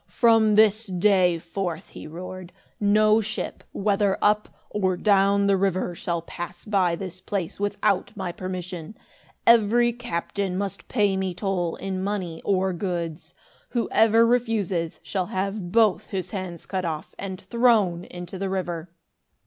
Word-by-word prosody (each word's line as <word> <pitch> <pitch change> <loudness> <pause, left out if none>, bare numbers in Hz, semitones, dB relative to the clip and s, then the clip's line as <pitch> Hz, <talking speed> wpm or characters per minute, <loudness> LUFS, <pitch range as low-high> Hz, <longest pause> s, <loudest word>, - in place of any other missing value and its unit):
"From 225 -3 +4
this 215 +1 +4
day 185 -2 +3
forth," 170 0 -4
he - - -9
roared, 180 +2 -8 0.3
"no 215 +1 +4
ship, 220 0 -4
whether 200 -1 +1
up 210 0 +2 0.2
or 185 -3 0
down 200 0 +3
the 200 0 +4
river, 185 -2 0
shall 170 -1 -3
pass 175 +1 -7
by 190 -5 +2
this 185 0 -7
place, 190 -2 -3
without 205 -1 0
my 190 -3 -3
permission. 180 0 -6 0.5
Every 235 +1 +5
captain 200 -4 -3
must 200 -1 -4
pay 205 -5 +2
me 190 -2 -2
toll, 180 -3 -1
in 190 -1 -4
money 190 -5 -3
or 190 -1 +1
goods. 170 -3 -4 0.3
Whoever 230 -1 +4
refuses, 215 -9 0
shall 175 +4 -2
have 195 -1 -3
both 220 -4 +3
his 185 -2 -4
hands 185 -4 -5
cut 190 -2 -2
off 160 -3 -4
and 190 -2 -5
thrown 215 -8 +2
into 175 +1 -8
the 195 0 -2
river. 175 -3 -3
190 Hz, 140 wpm, -25 LUFS, 175-210 Hz, 0.5 s, Every